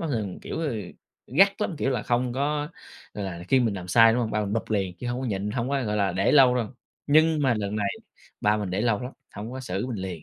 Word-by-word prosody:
ba 165 - -2
thường, 110 - -3
kiểu, - - -5
ờ, 150 -6 -1 0.5
gắt 195 - +4
lắm, 200 -4 -1
kiểu 135 - 0
là, 125 -5 -1
không 120 +1 0
có, 145 +3 -1 0.5
gọi 105 - -4
là, 85 -3 -5
khi 135 - +4
mình 115 -4 +1
làm 90 -2 -7
sai, 115 +4 +7
đúng 125 - +1
hông? 110 - -1
Ba 105 0 0
mình 100 -1 -2
bụp 115 0 -2
liền, 95 -4 0
chứ 125 - -6
hông 120 +1 -2
có 130 - -3
nhịn, 100 -1 -2
hông 120 +3 -2
có, 140 -1 0
gọi 105 0 -1
là, 100 -3 +1
để 95 +2 +2
lâu 130 -4 +7
đâu, 115 -4 -1 0.4
nhưng 155 +1 +4
mà 130 -3 +3
lần 105 0 -3
này, 100 -1 0 0.5
ba 105 +1 +3
mình 100 -4 -3
để 95 - -1
lâu 115 -2 +1
lắm, 125 +2 -6 0.2
hông 105 +4 -6
có 130 - -5
xử 100 -2 -3
mình 120 -6 -4
liền. 90 -4 -5
115 Hz, 275 wpm, -26 LUFS, 100-130 Hz, 0.5 s, sai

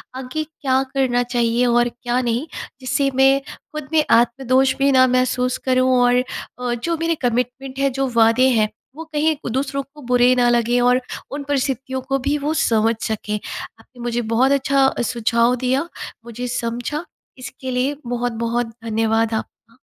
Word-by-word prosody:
आगे 265 +4 -4
क्या 275 -4 -1
करना 250 -3 +1
चाहिए 240 0 +1
और 240 0 +3
क्या 245 +1 -2
नहीं? 240 +5 -1 0.3
जिससे 275 +2 0
मैं 270 +1 +5 0.4
ख़ुद 305 -3 -6
में 310 -1 +4
आत्मदोष 255 +3 +3
भी 275 0 +3
ना 255 -1 +6
महसूस 255 0 +1
करूँ 255 0 +3
और 245 +1 +4 0.4
अ, 245 -1 -1
जो 330 +8 -2
मेरे 330 +1 0
कमिटमेंट 250 +2 -2
है, 275 0 +3
जो 270 +1 -1
वादे 230 +3 +5
हैं 215 0 +2 0.3
वो 325 - -7
कहीं 310 +1 +2 0.2
दूसरों 275 +1 -1
को 300 - -13
बुरे 250 0 +4
ना 245 -1 +3
लगे 240 +1 +2
और 250 +1 +4 0.3
उन 285 0 -4
परिस्थितियों 265 -2 -1
को 270 - +2
भी 290 +1 +1
वो 295 +2 -1
समझ 230 -7 +2
सकें। 215 -1 -3 0.5
आपने 250 - -20
मुझे 240 0 -1
बहुत 260 +4 +3
अच्छा 275 -1 +3 0.2
सुझाव 235 +1 +2
दिया, 265 +6 +1 0.4
मुझे 240 +1 -5
समझा 240 +5 -3 0.3
इसके 255 +1 -7
लिए 260 +3 0
बहुत-बहुत 235 -1 -2
धन्यवाद 225 0 +1
आपका। 230 +1 -6
250 Hz, 160 wpm, -20 LUFS, 240-270 Hz, 0.5 s, ना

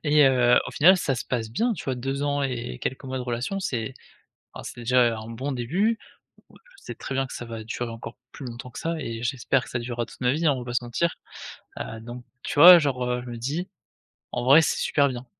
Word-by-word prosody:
et 150 -1 +5
heu, 125 -2 +5
au - - -6
final, 185 +6 +6
ça 140 -6 0
se 120 - -5
passe 115 -3 -2
bien, 230 - 0
tu 175 - -8
vois? 130 - -1
2 135 +3 -3
ans 145 0 0
et 120 - -4
quelques 130 - -4
mois 130 0 -4
de - - -3
relation, 125 +10 -3
c'est 130 - -3 0.6
ah, - - -8
c'est - - -8
déjà 120 -1 +3
un 110 +1 -8
bon 130 +5 -4
début. 180 - 0 0.5
Je - - -19 0.3
sais - - -7
très - - -6
bien 135 0 0
que - - -11
ça 120 - -6
va 115 -1 -7
durer 115 +2 -4
encore 115 +1 -8 0.2
plus 145 - -9
longtemps 120 +1 -8
que - - -9
ça 165 0 -2
et 115 -4 -5
j'espère 130 +1 0
que - - -12
ça 125 - -2
durera 120 0 -3
toute - - -16
ma 125 0 +2
vie, 160 +3 0
hein, 150 - +5
on 135 - -3
va 120 - -8
pas 120 - -5
se 120 - 0
mentir, 150 +8 -1 0.7
heu, 110 - -6
donc 120 +2 -8 0.2
tu - - -5
vois, 175 +2 +12
genre, 140 -5 -1
heu, 125 0 -1
je 125 - -8
me 120 - -6
dis: 150 - -3 0.7
«En 125 - -2
vrai, 140 +5 +8
c'est 160 - +1
super 145 -1 +2
bien!» 125 0 -6
125 Hz, 255 wpm, -25 LUFS, 120-145 Hz, 0.7 s, vois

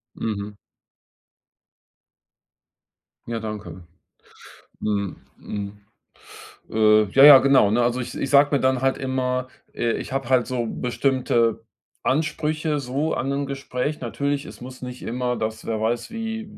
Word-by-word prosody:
Mhm. 105 -1 -4 2.7
Ja, 115 -1 -3
danke. 100 -5 -7 1.0
Mhm, 100 -3 -2 0.2
mhm. 100 0 -6 0.9
Äh, 110 -1 +5
ja, 135 - +6
ja, 145 -2 +12
genau, 135 -7 +4
ne? 120 - +2
Also, 120 +1 0
ich 120 - -7
ich 135 - -2
sage 145 +1 +5
mir - - +2
dann 130 -1 +2
halt 135 0 +1
immer, 130 -1 -1 0.3
äh, 115 -1 0
ich - - -5
habe 135 -2 -3
halt 130 -2 +3
so 125 -2 -2
bestimmte 125 -2 0 0.4
Ansprüche 155 +1 0
so 140 +4 -2
an 135 - -2
'nem 140 +1 -1
Gespräch. 135 +1 -3
Natürlich, 140 +3 -2
es - - -11
muss 130 +1 -10
nicht 125 0 -7
immer 125 +1 -2
das, 110 0 -4
wer 110 -1 -2
weiß, 115 - -1
wie 225 -2 -5
125 Hz, 140 wpm, -23 LUFS, 115-140 Hz, 2.7 s, ja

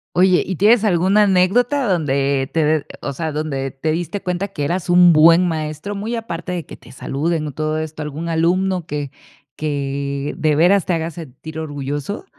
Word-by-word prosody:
Oye, 185 0 +4
¿y 190 - -4
tienes 220 +4 +4
alguna 195 +2 +3
anécdota 230 +9 +2
donde 140 -6 0
te 160 -2 +1
de 155 -1 +1 0.2
o 140 - -3
sea, 160 +3 -3
donde 140 -3 -3
te 155 +3 -2
diste 175 +4 -3
cuenta 180 +2 -2
que 145 -6 -4
eras 175 +4 -2
un 175 -1 +6
buen 165 +3 +6
maestro, 155 +4 -3
muy 220 +4 -3
aparte 180 -6 -5
de 175 -3 -3
que - - -10
te - - -18
saluden 155 +4 -2
o - - -7
todo 155 +2 -2
esto? 155 0 -5
¿Algún 150 +3 -5
alumno 175 +2 +1
que 145 -3 -4 0.4
que 140 -1 -3
de 155 -1 +2
veras 180 +4 +4
te 180 - 0
haga 165 0 -2
sentir 160 0 -9
orgulloso? 145 - -4
160 Hz, 185 wpm, -19 LUFS, 150-185 Hz, 0.4 s, un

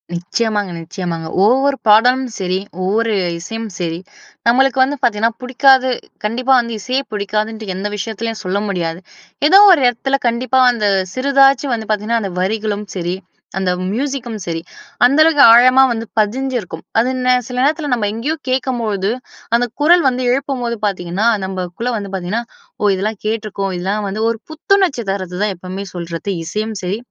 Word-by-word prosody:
நிச்சயமாங்க, 205 +2 -1
நிச்சயமாங்க. 165 -1 -5 0.2
ஒவ்வொரு 270 +4 +3
பாடலும் 250 +5 +5
சரி, 185 0 -1 0.2
ஒவ்வொரு 220 +4 +1 0.3
இசையும் 225 +5 -6
சரி 170 -1 -2 0.5
நம்மளுக்கு 265 +2 +3
வந்து 285 +2 -1
பாத்தீங்கன்னா 230 -1 +2
புடிக்காது. 260 +1 +4 0.3
கண்டிப்பா 250 +5 +1
வந்து 235 -1 -3
இசையே 255 +7 -1
புடிக்காதுன்ட்டு 210 0 -3
எந்த 195 +2 -3
விஷயத்திலயும் 220 +2 -4
சொல்ல 185 +2 -1
முடியாது. 175 -3 -2 0.5
ஏதோ 385 - +7
ஒரு 320 -6 +5
இடத்துல 270 +3 0
கண்டிப்பா 255 +3 +1
அந்த 215 -3 -2 0.3
சிறிதாச்சு 275 +1 +3
வந்து 220 -2 -4
பாத்தீங்கன்னா 215 +2 0
அந்த 195 -2 -4
வரிகளும் 210 +2 -2
சரி, 175 0 -2 0.4
அந்த 185 -1 0 0.2
மியூசிக்கும் 250 -2 -3
சரி, 165 -1 -3 0.4
அந்த 280 +5 +3
அளவுக்கு 305 -3 +5
ஆழமா 255 +3 +7
வந்து 230 -1 -3
பதிஞ்சிருக்கும். 245 +3 -2 0.2
அது 245 +3 +2 0.2
நே 255 - +5 0.2
சில 250 - -5
நேரத்தல 295 0 0
நம்ம 210 -3 -1
எங்கேயோ 270 +9 -2
கேட்கும்போது 230 -6 -1 0.5
அந்த 245 - 0
குரல் 345 +3 +5
வந்து 255 0 -3
எழுப்பும்போது 255 -3 -1
பாத்தீங்கன்னா, 185 +2 -1 0.2
நமக்குள்ள 190 +5 -4
வந்து 200 -2 -6
பாத்தீங்கன்னா, 190 +6 -2 0.4
ஓ - - +1
இதெல்லாம் 210 +2 -3
கேட்ருக்கோம். 210 -3 -2
இதெல்லாம் 200 +4 -2
வந்து 215 +3 -4
ஒரு 225 - -6
புத்துணர்ச்சி 335 - +1
தருது 185 -2 -4
தான் 210 - 0
எப்பவுமே 185 +2 -6
சொல்றது. 170 +2 -5 0.2
இசையும் 215 +5 -3
சரி 190 +4 -2
225 Hz, 150 wpm, -17 LUFS, 195-255 Hz, 0.5 s, ஏதோ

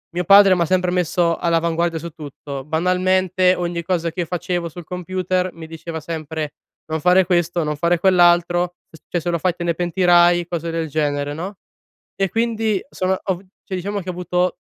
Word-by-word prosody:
mio 180 - 0
padre 195 +1 +7
m'ha 175 -2 +2
sempre 180 +1 +1
messo 175 -1 +1
all'avanguardia 170 0 0
su 170 +2 -6
tutto. 145 -3 -8
Banalmente, 185 +3 +2
ogni 175 -1 -3
cosa 170 -1 -1
che 175 - -2
facevo 175 0 -3
sul 170 +1 -10
computer, 185 +1 -2
mi 165 -1 -10
diceva 160 0 -7
sempre: 155 -1 -5 0.3
"Non 160 0 -3
fare 180 +3 +5
questo, 175 -1 +1
non 150 0 -2
fare 170 +3 +1
quell'altro, 175 -1 +3
s 160 - -16
cioè 175 - 0
se 170 - -3
lo 170 -1 0
fai, 180 +1 +1
te 175 - -5
ne 170 - +1
pentirai." 175 0 +3
Cose 170 -1 -3
del 165 -1 -2
genere, 145 -1 -1
no, 180 +6 -6 0.6
e 195 0 0
quindi 225 -2 0
son 185 0 0
ov 185 -3 -2 0.2
cioè, 190 - -6
diciamo 200 +3 -3
che 185 - -10
ho - - -3
avuto 180 +1 -1
175 Hz, 185 wpm, -20 LUFS, 165-185 Hz, 0.6 s, padre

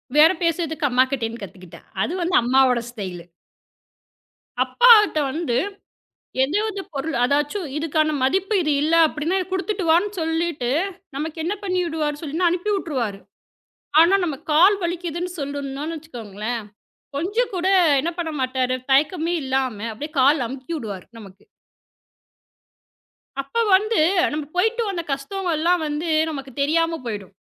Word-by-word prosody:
பேரம் 320 +4 +5
பேசுறதுக்கு 320 -3 0
அம்மாகிட்டயிருந்து 250 -3 0
கத்துக்கிட்டேன். 185 -3 -12
அது 315 - -1
வந்து 345 +1 0
அம்மாவோட 250 0 +3
ஸ்டைலு. 185 -7 -7 1.4
அப்பாகிட்ட 450 -8 +6
வந்து 300 -6 -1 0.9
ஏதாவது 400 +8 0
பொருள், 285 +2 -3
"அதாச்சும் 295 +7 0
இதுக்கான 310 0 +1
மதிப்பு 385 +10 +1
இது 305 -1 +1
இல்ல" 315 +2 +2
அப்படின்னா, 315 +5 -2
"குடுத்துட்டு 380 0 -2
வான்னு" 355 +6 +3
சொல்லிட்டு 325 -5 -1 0.5
நமக்கு 310 +3 -4
என்ன 365 +5 -1
பண்ணிவிடுவாருன்னு 325 -5 -1
சொல்லுனா 325 +4 +1
அனுப்பி 410 +3 -1
விட்ருவாறு. 245 - -3 0.8
ஆனா, 340 +4 +6
நம்ம 300 -5 -2 0.2
கால் 365 +7 +6
வலிக்குதுன்னு 345 0 -3
சொல்லணும்னு 285 +3 -4
வச்சுக்கோங்களேன். 230 -6 -6 0.6
கொஞ்சம் 410 +11 -1
கூட 365 +1 0 0.3
என்ன 340 +4 -2
பண்ண 325 -2 -3
மாட்டாரு, 255 0 0
தயக்கமே 320 +5 +2
இல்லாம 260 -4 -1 0.2
அப்படியே 295 +8 -7
கால் 275 -1 +4
அமுக்கி 265 +6 -7
விடுவாரு 205 - -6
நமக்கு. 195 -2 -14 2.0
அப்ப 460 +12 -1
வந்து, 430 +1 +1 0.3
நம்ம 300 -1 -3
போயிட்டு 445 +6 +1
வந்த 350 -4 -3
கஷ்டங்கள்லாம் 335 +3 0
வந்து 300 +3 -3 0.2
நமக்குத் 275 -3 -7
தெரியாம 330 +3 +1
போயிடும். 205 -4 -6
310 Hz, 120 wpm, -22 LUFS, 265-345 Hz, 2.0 s, அப்பாகிட்ட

